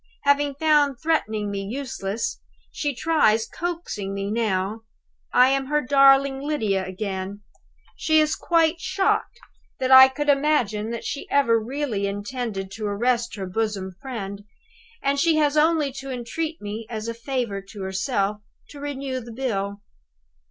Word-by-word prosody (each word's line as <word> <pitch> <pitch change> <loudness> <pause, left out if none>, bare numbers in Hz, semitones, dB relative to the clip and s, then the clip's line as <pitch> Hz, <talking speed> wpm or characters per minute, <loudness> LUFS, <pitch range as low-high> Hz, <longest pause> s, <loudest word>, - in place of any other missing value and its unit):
Having 285 0 +2
found 290 -3 +3
threatening 220 -10 0
me 200 -1 -3
useless, 230 -2 -4 0.3
she 290 -3 -2
tries 240 -7 +2
coaxing 325 - -4
me 200 +1 -3
now. 215 -1 -1 0.5
I 250 +1 +6
am 270 0 0
her 300 +1 +2
darling 275 0 +5
Lydia 220 -10 0
again! 195 +1 -5 0.5
She 315 0 +3
is 305 0 +2
quite 335 0 +2
shocked 385 +2 0 0.4
that 260 0 -1
I 260 0 +11
could 290 +3 -4
imagine 235 -7 +1
she 285 - -5
ever 235 -5 +3
really 240 -5 -2
intended 205 -1 -4
to 215 +1 -4
arrest 235 +3 0
her 195 -2 -4
bosom 195 -1 -2
friend; 205 -6 -6 0.6
and 280 0 +1
she 325 +2 +3
has 300 -1 +2
only 305 -2 +3
to 270 +1 -8
entreat 270 +6 -4
me, 210 +2 -6
as 220 -1 -5
a 230 - -2
favor 230 -4 -3
to 200 -2 -7
herself, 195 +2 -1 0.3
to 290 - -11
renew 275 -2 -4
the 235 -1 -10
bill! 200 -5 -3
245 Hz, 145 wpm, -24 LUFS, 205-285 Hz, 0.6 s, I